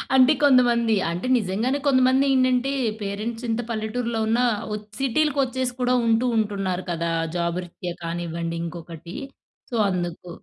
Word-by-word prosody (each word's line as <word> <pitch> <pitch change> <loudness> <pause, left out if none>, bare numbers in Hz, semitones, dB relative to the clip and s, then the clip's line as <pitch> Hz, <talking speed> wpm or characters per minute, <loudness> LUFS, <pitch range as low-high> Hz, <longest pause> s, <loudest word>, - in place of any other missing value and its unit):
అంటే 260 +3 +7
కొంతమంది, 240 -4 +4 0.2
అంటే 175 +8 -3
నిజంగానే 225 +7 -1
కొంతమందేంటంటే 260 0 +3 0.3
పేరెంట్సింత 225 +3 -3
పల్లెటూరులో 225 +1 -2
ఉన్నా, 240 +3 +2 0.2
వో 210 - -2 0.2
సిటీలకొచ్చేసి 265 -2 +1
కూడా 250 0 +2
ఉంటూ, 230 +2 +3
ఉంటున్నారు 195 -4 -1
కదా! 170 0 -1 0.2
జాబు 170 +1 -1
రిత్య 175 0 -6
కానివ్వండి, 170 0 -3
ఇంకొకటి. 170 0 -8 0.6
సో, - - -2
అందుకు. 175 -1 -4
225 Hz, 115 wpm, -24 LUFS, 175-255 Hz, 0.6 s, అంటే